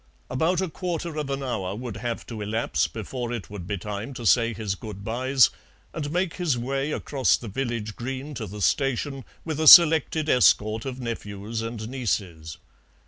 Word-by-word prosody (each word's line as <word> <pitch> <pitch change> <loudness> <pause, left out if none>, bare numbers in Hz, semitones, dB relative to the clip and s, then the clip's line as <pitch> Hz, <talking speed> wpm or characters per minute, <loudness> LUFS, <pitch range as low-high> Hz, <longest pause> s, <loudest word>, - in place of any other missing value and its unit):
About 165 +8 +1
a 190 - 0
quarter 170 -1 -4
of 150 -2 -3
an 135 0 -2
hour 100 -7 -3
would 115 -2 -6
have 115 +1 -4
to 110 -3 -7
elapse 110 +2 0
before 120 +2 -5
it 115 -4 -6
would 95 -4 -7
be 100 - -2
time 105 +7 -6
to 120 - -7
say 115 +2 +4
his 110 -3 -3
good 100 0 -8
byes 130 +3 +3 0.4
and 145 -3 -4
make 175 +2 -1
his 165 -8 0
way 135 +4 -2
across 135 -3 +1
the 120 - -9
village 115 -2 -3
green 135 +4 -5
to 115 -5 -5
the 105 +2 -8
station, 135 - 0 0.2
with 160 -2 -3
a 160 - +2
selected 160 -2 +8
escort 110 -4 +3
of 130 -1 -5
nephews 110 -2 -5
and 115 -1 -5
nieces. 90 - -3
120 Hz, 180 wpm, -25 LUFS, 110-140 Hz, 0.4 s, selected